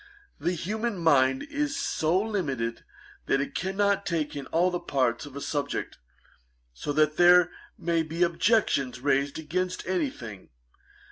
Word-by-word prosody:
The 175 - 0
human 215 +6 -2
mind 135 -6 +3
is 290 -1 -2
so 160 +4 +1
limited, 145 - -2 0.4
that 135 - +2
it 140 - -3
cannot 200 +2 0
take 160 -6 -2
in 140 -2 -6
all 175 +3 +2
the 175 - -2
parts 130 -3 0
of 140 - -12
a 140 - -5
subject, 145 -1 -3 0.7
so 65 - -4
that 155 0 +2
there 175 0 +6 0.3
may 170 -1 +1
be 160 +2 -1
objections 170 - +2
raised 140 +1 +1
against 180 +4 -3
any 185 +10 0
thing. 110 - -10
165 Hz, 145 wpm, -27 LUFS, 140-185 Hz, 0.7 s, there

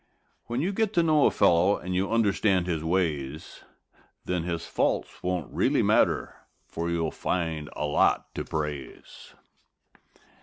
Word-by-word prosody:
When 120 +2 -2
you 180 +5 0
get 220 0 0
to 170 - +3
know 155 -3 +4
a - - +4
fellow 90 +4 +3
and 90 +1 -5
you 95 +3 0
understand 100 -4 +2
his 80 -3 -2
ways, 80 -5 -2 0.6
Then 90 -2 -2
his 85 -1 -3
faults - - -1
won't 90 -3 -3
really - - +2
matter, - - +2 0.3
for 85 +1 -4
you'll 85 -2 -1
find 80 -4 -2
a - - -2
lot 75 - +1
to - - -4
praise. 75 -3 -6
90 Hz, 145 wpm, -27 LUFS, 80-100 Hz, 0.6 s, know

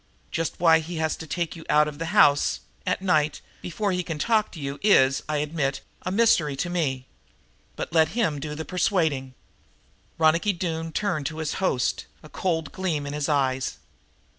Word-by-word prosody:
Just 165 0 -2
why 165 -2 +6
he 165 +2 -6
has 160 -1 0
to 160 - -9
take 170 +1 -2
you 165 - -10
out 150 0 +5
of 150 0 -7
the 165 - -3
house, 145 -3 +4 0.3
at - - 0
night, 155 -5 +2 0.2
before 200 +4 -2
he 180 0 0
can 165 -3 -5
talk 215 +5 +1
to 165 - -10
you 140 0 -5
is, 135 -10 +4
I 155 - 0
admit, 145 -2 -1 0.2
a 185 - -3
mystery 185 -9 +3
to 175 +6 -3
me. 135 -7 -1 0.7
But - - -5
let 160 -1 +5
him 160 -11 +1
do 150 +1 -5
the 160 +1 -5
persuading." 160 -8 0 0.8
Ronicky 165 +6 +3
Doone 165 -2 -3
turned 165 -6 -1
to 155 - -6
his 160 -1 -2
host, 130 -9 0 0.2
a 155 - -12
cold 165 -5 -2
gleam 165 -6 -2
in 140 - -5
his 150 +1 -2
eyes. 135 -3 0
160 Hz, 185 wpm, -25 LUFS, 145-175 Hz, 0.8 s, why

